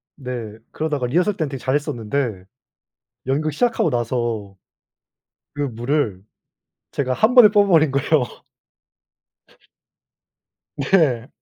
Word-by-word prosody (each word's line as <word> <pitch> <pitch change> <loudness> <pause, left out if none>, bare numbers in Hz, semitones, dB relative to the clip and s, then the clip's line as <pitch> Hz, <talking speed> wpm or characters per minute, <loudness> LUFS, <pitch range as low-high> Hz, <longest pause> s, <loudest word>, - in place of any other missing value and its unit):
네. 120 -6 -6
그러다가 150 -4 -2
리허설 180 +10 +1
때는 155 -4 -1
되게 135 -1 -6
잘했었는데 130 -6 -2 0.8
연극 150 +4 0
시작하고 225 0 +1
나서 120 -5 -2 1.0
그 145 - -3
무를 120 -5 -1 0.7
제가 130 -2 -1
1 220 - +2
번에 245 -4 +9
뽑아버린 195 -8 +4
거예요. 140 +2 +2 2.5
네. 140 -6 +2
140 Hz, 210 characters per minute, -21 LUFS, 120-155 Hz, 2.5 s, 번에